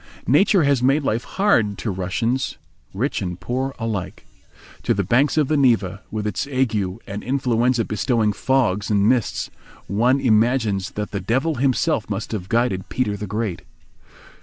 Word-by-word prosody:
Nature 175 Hz, -, +4 dB
has 140 Hz, -3 st, +2 dB
made 135 Hz, +4 st, +3 dB
life 115 Hz, -2 st, 0 dB
hard 120 Hz, -, +1 dB
to 110 Hz, -, -3 dB
Russian 95 Hz, +6 st, -1 dB, 0.6 s
rich 120 Hz, +8 st, -2 dB
and 90 Hz, -2 st, -4 dB
poor 130 Hz, +2 st, -3 dB
alike. 105 Hz, -5 st, -4 dB, 0.6 s
To -, -, +1 dB
the 100 Hz, -, 0 dB
banks 130 Hz, -, +2 dB
of 150 Hz, -3 st, +3 dB
the 155 Hz, -, +1 dB
Neva, 110 Hz, -8 st, +2 dB
with 105 Hz, -1 st, -4 dB
its 105 Hz, +6 st, -2 dB
ague 130 Hz, -4 st, 0 dB, 0.3 s
and 100 Hz, +1 st, -6 dB
influenza 125 Hz, -2 st, +1 dB
bestowing 110 Hz, 0 st, 0 dB
fogs 110 Hz, -5 st, 0 dB
and 100 Hz, -1 st, +3 dB
mists, 120 Hz, -2 st, 0 dB, 0.3 s
one 120 Hz, +7 st, +2 dB
imagines 110 Hz, -4 st, +2 dB
that 105 Hz, 0 st, -4 dB
the 100 Hz, -, -2 dB
Devil 130 Hz, -, 0 dB
himself 130 Hz, -5 st, +1 dB
must -, -, -4 dB
have 95 Hz, -4 st, -4 dB
guided 115 Hz, -5 st, 0 dB
Peter 105 Hz, -5 st, -1 dB
the 105 Hz, +1 st, -6 dB
Great. 105 Hz, -3 st, -3 dB
115 Hz, 160 wpm, -22 LUFS, 100-130 Hz, 0.6 s, Nature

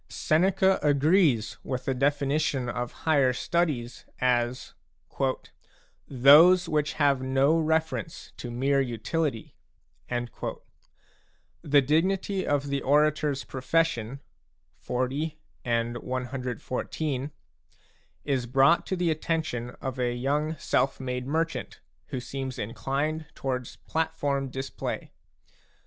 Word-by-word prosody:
Seneca 190 Hz, +4 st, +2 dB
agrees 145 Hz, -, +3 dB
with 130 Hz, -2 st, -4 dB
the 135 Hz, -, +1 dB
definition 140 Hz, 0 st, 0 dB
of 120 Hz, 0 st, -3 dB
higher 140 Hz, -5 st, +4 dB
studies 135 Hz, -5 st, -1 dB, 0.2 s
as 125 Hz, 0 st, 0 dB, 0.7 s
" -, -, -28 dB
those 155 Hz, +8 st, +7 dB
which 150 Hz, -2 st, 0 dB
have 140 Hz, -3 st, +2 dB
no 135 Hz, +4 st, +3 dB
reference 160 Hz, 0 st, -1 dB
to 120 Hz, -, -6 dB
mere 135 Hz, +3 st, +1 dB
utility." 125 Hz, +1 st, -2 dB, 0.6 s
The 125 Hz, +3 st, -4 dB
dignity 185 Hz, +6 st, +1 dB
of 145 Hz, -1 st, 0 dB
the 140 Hz, 0 st, -1 dB
orator's 150 Hz, -1 st, +2 dB
profession 135 Hz, -2 st, -1 dB, 0.6 s
(XL. 130 Hz, -, -1 dB, 0.4 s
and 120 Hz, 0 st, 0 dB
CXIV.) 130 Hz, +3 st, -3 dB, 0.9 s
is 135 Hz, -4 st, 0 dB
brought 135 Hz, +7 st, +4 dB
to 190 Hz, -, -1 dB
the 175 Hz, -2 st, +1 dB
attention 155 Hz, -7 st, -2 dB
of 130 Hz, -1 st, -5 dB
a 120 Hz, -1 st, 0 dB
young 150 Hz, +5 st, -1 dB
self 135 Hz, 0 st, 0 dB
made 125 Hz, -1 st, -4 dB
merchant 165 Hz, +3 st, -2 dB, 0.3 s
who 130 Hz, -, -4 dB
seems 130 Hz, 0 st, -5 dB
inclined 140 Hz, +8 st, -2 dB
towards 130 Hz, -2 st, -3 dB
platform 145 Hz, -4 st, -2 dB
display. 135 Hz, +1 st, -5 dB
140 Hz, 100 wpm, -27 LUFS, 125-155 Hz, 0.9 s, those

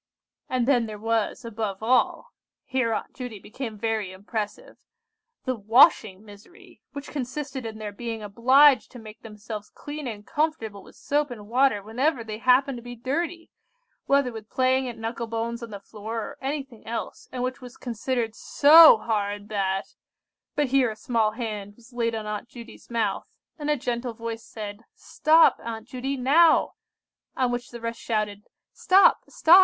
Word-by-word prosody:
"And 250 Hz, -2 st, 0 dB
then 245 Hz, -5 st, +3 dB
there 215 Hz, -1 st, -7 dB
was—above 220 Hz, -1 st, -2 dB
all—" 255 Hz, -, +1 dB, 0.3 s
here 255 Hz, -3 st, 0 dB
Aunt -, -, -3 dB
Judy 245 Hz, -4 st, -7 dB
became 220 Hz, +2 st, -7 dB
very 220 Hz, -3 st, -2 dB
impressive, 210 Hz, -, -6 dB, 0.7 s
"the 255 Hz, -, 0 dB
washing 215 Hz, -2 st, +4 dB
misery, 345 Hz, -, -16 dB
which 285 Hz, 0 st, -8 dB
consisted 265 Hz, -2 st, -4 dB
in 220 Hz, -1 st, -7 dB
their 215 Hz, -1 st, -5 dB
being 225 Hz, +1 st, -6 dB
obliged 260 Hz, +7 st, +5 dB
to -, -, -9 dB
make 220 Hz, -2 st, -12 dB
themselves 210 Hz, -1 st, -8 dB
clean 295 Hz, -1 st, -7 dB
and 210 Hz, -3 st, -7 dB
comfortable 295 Hz, -10 st, -2 dB
with -, -, -17 dB
soap 290 Hz, 0 st, 0 dB
and 215 Hz, -4 st, -9 dB
water 245 Hz, -3 st, +2 dB
whenever 245 Hz, +5 st, 0 dB
they 215 Hz, -1 st, -6 dB
happened 255 Hz, +1 st, +3 dB
to -, -, -12 dB
be 245 Hz, +1 st, -8 dB
dirty, 330 Hz, +8 st, -3 dB, 0.6 s
whether 275 Hz, -2 st, +3 dB
with 220 Hz, -1 st, -9 dB
playing 260 Hz, 0 st, +1 dB
at 235 Hz, -, -8 dB
knuckle 230 Hz, +1 st, -4 dB
bones 230 Hz, +1 st, -3 dB
on 235 Hz, -, -7 dB
the 205 Hz, -2 st, -7 dB
floor, 215 Hz, +3 st, -7 dB
or -, -, -7 dB
anything 270 Hz, -4 st, -5 dB
else, 230 Hz, +1 st, -5 dB
and 250 Hz, -1 st, -3 dB
which 255 Hz, 0 st, -3 dB
was 250 Hz, -1 st, -11 dB
considered 235 Hz, -1 st, -2 dB
so 310 Hz, +3 st, +8 dB
hard 205 Hz, -2 st, -2 dB
that—" 195 Hz, -2 st, -2 dB, 0.6 s
But 295 Hz, -3 st, +1 dB
here 265 Hz, -2 st, +3 dB
a 215 Hz, -, -6 dB
small 220 Hz, -1 st, 0 dB
hand 210 Hz, -4 st, -5 dB
was 240 Hz, +2 st, -19 dB
laid 230 Hz, -1 st, -1 dB
on 220 Hz, -1 st, -4 dB
Aunt 210 Hz, +2 st, -5 dB
Judy's 235 Hz, -2 st, -12 dB
mouth, 225 Hz, -4 st, -1 dB, 0.3 s
and 295 Hz, 0 st, -3 dB
a 300 Hz, -, +2 dB
gentle 240 Hz, -1 st, -3 dB
voice 230 Hz, 0 st, -6 dB
said, 205 Hz, -2 st, -7 dB, 0.2 s
"Stop, 320 Hz, +2 st, +4 dB
Aunt 225 Hz, -1 st, -6 dB
Judy, 265 Hz, +2 st, -3 dB
now!" 310 Hz, +6 st, +4 dB, 0.6 s
on 255 Hz, -2 st, +1 dB
which 245 Hz, 0 st, -4 dB
the 240 Hz, -, -9 dB
rest 230 Hz, 0 st, -5 dB
shouted, 210 Hz, -2 st, -2 dB, 0.3 s
"Stop! 385 Hz, +1 st, +5 dB
stop! 345 Hz, +4 st, +7 dB
235 Hz, 165 wpm, -25 LUFS, 215-260 Hz, 0.7 s, so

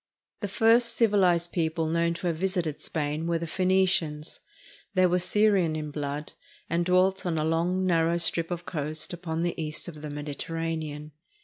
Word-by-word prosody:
The 205 Hz, -, -3 dB
first 230 Hz, +3 st, +4 dB
civilized 185 Hz, -6 st, +3 dB
people 160 Hz, -1 st, -1 dB
known 170 Hz, +1 st, +1 dB
to 170 Hz, -, -7 dB
have 170 Hz, -2 st, 0 dB
visited 180 Hz, -4 st, -1 dB
Spain 155 Hz, +1 st, -2 dB
were 170 Hz, 0 st, +1 dB
the 165 Hz, -, -4 dB
Phoenicians. 185 Hz, -3 st, +1 dB, 0.6 s
They 185 Hz, 0 st, +5 dB
were 180 Hz, 0 st, +2 dB
Syrian 190 Hz, -3 st, +2 dB
in 150 Hz, -1 st, -4 dB
blood, 145 Hz, 0 st, -4 dB, 0.3 s
and 170 Hz, +1 st, 0 dB
dwelt 185 Hz, +2 st, +2 dB
on 170 Hz, -3 st, -1 dB
a 155 Hz, -, 0 dB
long, 175 Hz, +4 st, +1 dB
narrow 170 Hz, -1 st, +2 dB
strip 165 Hz, -1 st, +2 dB
of 175 Hz, -1 st, -4 dB
coast 155 Hz, 0 st, -2 dB
upon 165 Hz, -1 st, -3 dB
the 175 Hz, -, 0 dB
east 155 Hz, +2 st, -4 dB
of 155 Hz, -4 st, -9 dB
the 150 Hz, -, -6 dB
Mediterranean. 150 Hz, +1 st, -4 dB
170 Hz, 170 wpm, -27 LUFS, 155-185 Hz, 0.6 s, They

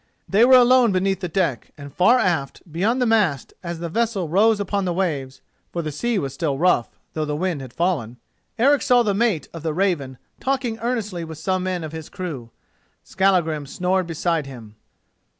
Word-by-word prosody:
They 205 Hz, +4 st, +4 dB
were 260 Hz, +1 st, +7 dB
alone 250 Hz, -2 st, +5 dB
beneath 190 Hz, 0 st, 0 dB
the 185 Hz, -, -3 dB
deck, 165 Hz, -7 st, -2 dB
and 140 Hz, -1 st, -10 dB
far 230 Hz, +8 st, +5 dB
aft, 165 Hz, -, -1 dB
beyond 205 Hz, +10 st, 0 dB
the 250 Hz, -, +2 dB
mast, 205 Hz, -, +1 dB
as 170 Hz, -1 st, -5 dB
the 170 Hz, +1 st, -4 dB
vessel 215 Hz, -1 st, -1 dB
rose 205 Hz, +6 st, +3 dB
upon 200 Hz, 0 st, -1 dB
the 175 Hz, -, -1 dB
waves—for 155 Hz, -1 st, -4 dB
the 155 Hz, -, -3 dB
sea 235 Hz, +10 st, -1 dB
was 140 Hz, -7 st, -3 dB
still 150 Hz, -6 st, -2 dB
rough, 165 Hz, -7 st, +2 dB, 0.2 s
though 155 Hz, -, -2 dB
the 150 Hz, -1 st, -2 dB
wind 170 Hz, -2 st, -2 dB
had 130 Hz, -2 st, -9 dB
fallen—Eric 175 Hz, -, -1 dB
saw 245 Hz, -1 st, +4 dB
the 205 Hz, -3 st, +1 dB
mate 205 Hz, -6 st, 0 dB
of 165 Hz, -, -7 dB
the 160 Hz, -1 st, -2 dB
Raven 165 Hz, -9 st, -1 dB, 0.2 s
talking 255 Hz, -4 st, -1 dB
earnestly 215 Hz, -7 st, -2 dB
with 160 Hz, -1 st, -8 dB
some 185 Hz, +4 st, -1 dB
men 180 Hz, -2 st, -2 dB
of 155 Hz, -, -6 dB
his 160 Hz, -1 st, -8 dB
crew. 155 Hz, -11 st, -6 dB, 0.5 s
Skallagrim 170 Hz, -7 st, +1 dB
snored 180 Hz, +4 st, -1 dB
beside 165 Hz, -2 st, -1 dB
him. 115 Hz, -5 st, -11 dB
180 Hz, 185 wpm, -22 LUFS, 155-205 Hz, 0.5 s, were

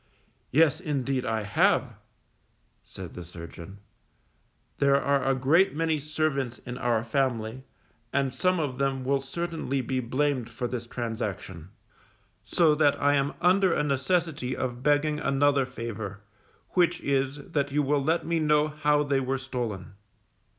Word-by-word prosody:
Yes, 155 Hz, 0 st, +4 dB
indeed, 135 Hz, -3 st, -1 dB
I 110 Hz, -1 st, -1 dB
have_, 100 Hz, -, +2 dB, 0.9 s
said 95 Hz, -3 st, -10 dB
the 90 Hz, -, -7 dB
surgeon, 85 Hz, +2 st, -10 dB, 1.0 s
_there 140 Hz, -1 st, +4 dB
are 140 Hz, 0 st, +1 dB
a 135 Hz, 0 st, +2 dB
great 155 Hz, +8 st, +3 dB
many 160 Hz, -1 st, +1 dB
servants 145 Hz, -4 st, -1 dB
in 125 Hz, 0 st, -6 dB
our 120 Hz, -3 st, +1 dB
family, 120 Hz, 0 st, -1 dB, 0.5 s
and 135 Hz, -2 st, 0 dB
some 185 Hz, +5 st, +1 dB
of 140 Hz, -5 st, -2 dB
them 135 Hz, -1 st, 0 dB
will 135 Hz, +1 st, +1 dB
certainly 160 Hz, -1 st, -3 dB
be 130 Hz, +1 st, -2 dB
blamed 130 Hz, 0 st, -1 dB
for 120 Hz, +2 st, -4 dB
this 120 Hz, -1 st, -5 dB
transaction; 105 Hz, -8 st, -5 dB, 0.7 s
so 165 Hz, -3 st, +3 dB
that 150 Hz, -1 st, +3 dB
I 145 Hz, 0 st, +3 dB
am 140 Hz, 0 st, +1 dB
under 185 Hz, +1 st, +4 dB
a 150 Hz, -, +1 dB
necessity 145 Hz, -1 st, 0 dB
of 125 Hz, -1 st, -3 dB
begging 150 Hz, +2 st, +2 dB
another 140 Hz, -1 st, +2 dB
favour, 110 Hz, -5 st, -6 dB, 0.5 s
which 175 Hz, -2 st, +2 dB
is, 135 Hz, 0 st, 0 dB, 0.2 s
that 140 Hz, -2 st, 0 dB
you 145 Hz, +1 st, +2 dB
will 145 Hz, +1 st, +1 dB
let 160 Hz, +4 st, +1 dB
me 170 Hz, 0 st, 0 dB
know 150 Hz, -1 st, +3 dB
how 150 Hz, -1 st, +2 dB
they 140 Hz, -2 st, +1 dB
were 135 Hz, 0 st, -1 dB
stolen? 120 Hz, -8 st, -5 dB
135 Hz, 145 wpm, -27 LUFS, 125-150 Hz, 1.0 s, Yes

